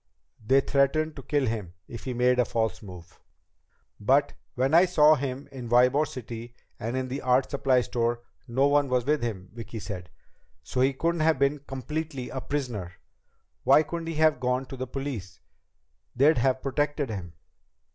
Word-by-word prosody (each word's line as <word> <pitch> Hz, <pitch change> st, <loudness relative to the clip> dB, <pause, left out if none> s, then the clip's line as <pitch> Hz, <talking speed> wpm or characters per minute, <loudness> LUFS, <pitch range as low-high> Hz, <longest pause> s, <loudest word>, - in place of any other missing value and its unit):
"They 135 Hz, +5 st, +4 dB
threatened 150 Hz, +3 st, +1 dB
to -, -, -6 dB
kill 145 Hz, +1 st, 0 dB
him 105 Hz, -7 st, -4 dB
if 115 Hz, -, -9 dB
he 130 Hz, -2 st, -3 dB
made 125 Hz, +1 st, +3 dB
a -, -, +6 dB
false 110 Hz, -1 st, -1 dB
move." 90 Hz, -5 st, -12 dB, 0.8 s
"But 135 Hz, +7 st, +3 dB, 0.2 s
when 130 Hz, +4 st, +1 dB
I 170 Hz, +3 st, +7 dB
saw 155 Hz, -4 st, +5 dB
him 135 Hz, -1 st, -3 dB
in 125 Hz, -3 st, -7 dB
Ybor 125 Hz, +5 st, +4 dB
City 120 Hz, -1 st, -8 dB, 0.2 s
and 120 Hz, +2 st, -3 dB
in 130 Hz, 0 st, -2 dB
the 135 Hz, +3 st, -4 dB
art 130 Hz, +1 st, +2 dB
supply 135 Hz, -3 st, +2 dB
store 120 Hz, 0 st, -1 dB, 0.3 s
no 130 Hz, +3 st, +2 dB
one 145 Hz, -1 st, +3 dB
was 125 Hz, -1 st, +1 dB
with 150 Hz, +2 st, +1 dB
him," 100 Hz, -6 st, -4 dB
Vicki 115 Hz, -1 st, -8 dB
said. 95 Hz, -4 st, -6 dB, 0.5 s
"So 125 Hz, -, -2 dB
he 135 Hz, +1 st, +4 dB
couldn't 165 Hz, +4 st, -1 dB
have 160 Hz, -1 st, +3 dB
been 140 Hz, +2 st, +1 dB
completely 135 Hz, 0 st, -4 dB
a 130 Hz, -, -4 dB
prisoner. 120 Hz, -12 st, -4 dB, 0.7 s
Why 155 Hz, -, +6 dB
couldn't 165 Hz, +1 st, -5 dB
he 165 Hz, -, -3 dB
have 155 Hz, -3 st, +3 dB
gone 125 Hz, +1 st, 0 dB
to 135 Hz, -, -6 dB
the 130 Hz, 0 st, -5 dB
police? 125 Hz, -8 st, -5 dB, 0.8 s
They'd 145 Hz, +3 st, +4 dB
have 130 Hz, +1 st, +1 dB
protected 145 Hz, -1 st, -1 dB
him." 90 Hz, -5 st, -6 dB
130 Hz, 175 wpm, -27 LUFS, 120-145 Hz, 0.8 s, I